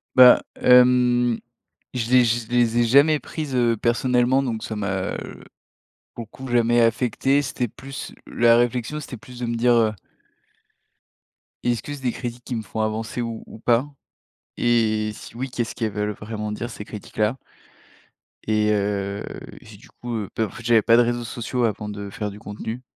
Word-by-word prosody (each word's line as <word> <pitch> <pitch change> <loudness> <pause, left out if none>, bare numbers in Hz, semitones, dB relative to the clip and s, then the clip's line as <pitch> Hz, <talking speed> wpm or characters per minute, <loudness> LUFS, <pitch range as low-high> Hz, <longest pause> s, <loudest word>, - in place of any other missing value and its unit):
Bah, 125 -1 +9 0.2
hem, 125 -1 +5 0.5
je 120 -2 -2
les 125 -1 +6
je 115 0 0
les 120 -1 +2
ai - - +5
jamais 140 +6 +5
prises, 150 -4 -5
heu, 120 -2 +2
personnellement, 125 +3 +2
donc 115 -4 -3
ça 110 - -4
m'a, 100 -2 -2 1.0
beaucoup, 120 +3 -8
jamais 120 0 +3
affecté. 125 +4 +2
C'était 125 -2 -2
plus, 135 +5 -8
la 115 0 +4
réflexion, 120 +5 0
c'était 135 -4 -8
plus 125 +2 -12
de 120 - -2
me 115 0 -2
dire: 120 +1 +3
«Heu 115 -2 +3 1.7
est-ce 120 -1 0
que 145 - -6
c'est 145 - -8
des 125 - +1
critiques 120 0 -6
qui 125 - -4
me 115 - -2
font 105 +2 -7
avancer 110 +2 -2
ou 115 -1 -5
ou - - -12
pas? 120 +3 +2 0.7
Et, 110 -2 +2
si - - -12
oui, 130 +2 -4
qu'est-ce 120 -2 -3
qu'elles 110 -3 -2
veulent 105 +1 -2
vraiment 105 +1 -5
dire 115 +3 -4
ces 105 - -8
critiques-là?». 105 +2 -2 1.1
Et 105 0 +2
heu, 100 -1 -1 0.4
j'ai - - -14
du - - -18
coup, 120 -1 -6
heu, 105 -3 -4
bah, 110 - +1
en - - -7
fait 115 - -11
j'avais 115 -1 +4
pas 115 +2 +4
de - - +7
réseaux 120 0 -1
sociaux 120 +1 -3
avant 105 -1 -2
de 100 -1 -6
faire 105 +1 -4
du 100 - -11
contenu, 110 +4 -6
120 Hz, 180 wpm, -23 LUFS, 110-125 Hz, 1.7 s, Bah